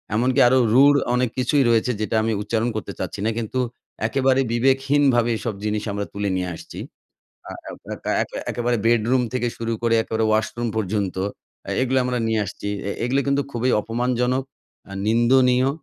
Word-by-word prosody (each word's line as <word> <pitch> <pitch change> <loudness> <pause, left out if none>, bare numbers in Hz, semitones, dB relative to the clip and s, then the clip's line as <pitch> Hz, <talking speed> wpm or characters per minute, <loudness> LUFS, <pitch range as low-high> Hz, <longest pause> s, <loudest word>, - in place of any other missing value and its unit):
এমনকি 125 +4 +2
আরও 130 +1 +4
রুড় 140 +3 +6 0.2
অনেক 125 -1 +1
কিছুই 130 +3 +2
রয়েছে 115 +1 +2
যেটা 110 - -1
আমি 115 - 0
উচ্চারণ 110 +3 -1
করতে 110 - -4
চাচ্ছি - - -4
না। - - +2
কিন্তু 115 +2 -2 0.5
একেবারে 135 +1 +2
বিবেকহীনভাবে 135 0 +2
এসব 115 -1 -3
জিনিস 105 0 -1
আমরা 100 0 -3
তুলে 100 0 -2
নিয়ে 90 -1 -2
আসছি। - - -10 0.7
আ - - -6 0.2
আ - - -6
ক্যাকা - - -4
একে - - -8
একেবারে 120 0 0
বেডরুম 120 +2 +3
থেকে 125 -1 0
শুরু 115 0 -2
করে 115 -1 +2
একেবারে 110 0 -1
ওয়াশরুম 115 +2 0
পর্যন্ত 100 -2 -1 0.5
আ - - -5
এগুলা 130 0 +2
আমরা 125 -1 -1
নিয়ে 110 -1 +1
আসছি। 100 +1 -7 0.2
অ্যা 100 - -3
এগুলো 130 +3 +1
কিন্তু 140 0 +2
খুবই 125 +1 0
অপমানজনক, 125 +3 0 0.5
আ - - -10 0.2
নিন্দনীয় 125 +3 +4
120 Hz, 170 wpm, -22 LUFS, 110-130 Hz, 0.7 s, রুড়